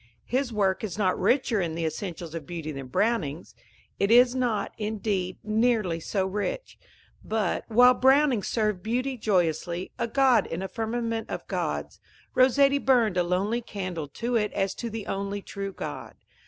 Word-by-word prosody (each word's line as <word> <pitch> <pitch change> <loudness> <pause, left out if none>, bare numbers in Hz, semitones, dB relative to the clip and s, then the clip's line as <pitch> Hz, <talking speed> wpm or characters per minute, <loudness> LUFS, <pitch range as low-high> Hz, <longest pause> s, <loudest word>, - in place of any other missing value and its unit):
His 255 0 -1
work 195 -3 +1
is 205 -4 -4
not 190 -3 +1
richer 245 -5 +2
in 165 -2 -2
the 165 0 -2
essentials 165 0 -5
of 165 -4 -6
beauty 165 -3 -5
than 135 -2 -7
Browning's 175 - -1 0.5
it 200 - +2
is 245 +2 +6
not, 240 -6 -1
indeed, 205 -4 -2
nearly 215 -5 +1
so 190 +3 -1
rich; 210 - -4 0.4
but, 215 -4 -1
while 245 +2 +6
Browning 265 -2 +4
served 210 -3 -1
beauty 250 +5 -1
joyously, 180 -4 0
a 235 - 0
god 260 0 +3
in 175 +3 -4
a - - -2
firmament 230 +1 -3
of - - -5
gods, - - -3 0.3
Rossetti 275 +2 +4
burned 240 -8 +3
a 180 - +3
lonely 190 +7 0
candle 185 -8 -5
to 235 - -3
it 210 -2 +1
as 195 -1 0
to 235 - -5
the 220 -1 -6
only 200 +1 -3
true 195 0 -5
god. - - -7
210 Hz, 165 wpm, -27 LUFS, 185-240 Hz, 0.5 s, is